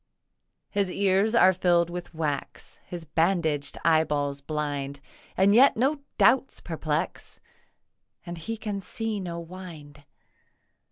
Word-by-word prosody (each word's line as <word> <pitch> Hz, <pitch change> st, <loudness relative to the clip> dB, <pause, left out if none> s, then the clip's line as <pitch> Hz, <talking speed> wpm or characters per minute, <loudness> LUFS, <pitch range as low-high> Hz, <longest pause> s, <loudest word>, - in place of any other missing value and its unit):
His 200 Hz, -2 st, 0 dB
ears 195 Hz, +4 st, +2 dB
are 190 Hz, -4 st, +6 dB
filled 175 Hz, -1 st, +2 dB
with 175 Hz, 0 st, -6 dB
wax, 155 Hz, -4 st, -4 dB
His 175 Hz, -2 st, -7 dB
bandaged 160 Hz, -3 st, 0 dB
eyeballs 150 Hz, -3 st, +2 dB
blind, 145 Hz, -2 st, -3 dB, 0.4 s
And 195 Hz, +2 st, +5 dB
yet 260 Hz, +3 st, +6 dB
no 275 Hz, +5 st, +2 dB, 0.2 s
doubts 265 Hz, +1 st, +3 dB
perplex, 160 Hz, 0 st, -3 dB, 0.9 s
And 175 Hz, -1 st, -6 dB
he 225 Hz, +8 st, -4 dB
can 210 Hz, -2 st, -4 dB
see 220 Hz, +1 st, -4 dB
the 175 Hz, -3 st, -5 dB
wind. 165 Hz, -5 st, -10 dB
170 Hz, 115 wpm, -27 LUFS, 150-195 Hz, 0.9 s, are